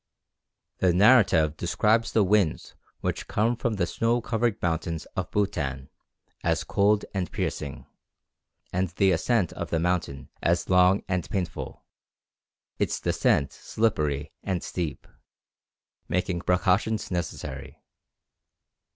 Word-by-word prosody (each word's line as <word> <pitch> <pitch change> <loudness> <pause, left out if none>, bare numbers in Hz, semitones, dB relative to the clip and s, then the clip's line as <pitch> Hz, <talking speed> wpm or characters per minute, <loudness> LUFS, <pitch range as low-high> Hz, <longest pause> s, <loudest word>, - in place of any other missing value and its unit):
The 90 -2 +3
narrative 95 - +5
describes 110 +6 +1
the 110 - +4
wind 100 -4 +1 0.3
which - - -3
comes 115 +3 0
from 115 -2 0
the 100 - +1
snow 115 +1 +1
covered 115 -2 -1
mountains 80 -1 -2
of - - -2
Bhutan 70 -10 -2 0.5
as - - +1
cold 105 +1 +2
and 95 -3 -2
piercing, 70 -2 -4 0.9
and 90 0 0
the 95 +2 +2
ascent 95 +2 +1
of - - -5
the 85 - 0
mountain 85 -5 -1
as 85 +1 +1
long 90 +1 +4
and 90 -2 -2
painful, 90 -3 -4 1.0
its - - 0
descent 70 - +1
slippery 75 -10 -1
and 90 -3 -2
steep, 85 -5 -4 1.0
making 90 -1 -1
precautions 95 +5 +1
necessary. 85 -3 -5
90 Hz, 115 wpm, -26 LUFS, 85-105 Hz, 1.0 s, narrative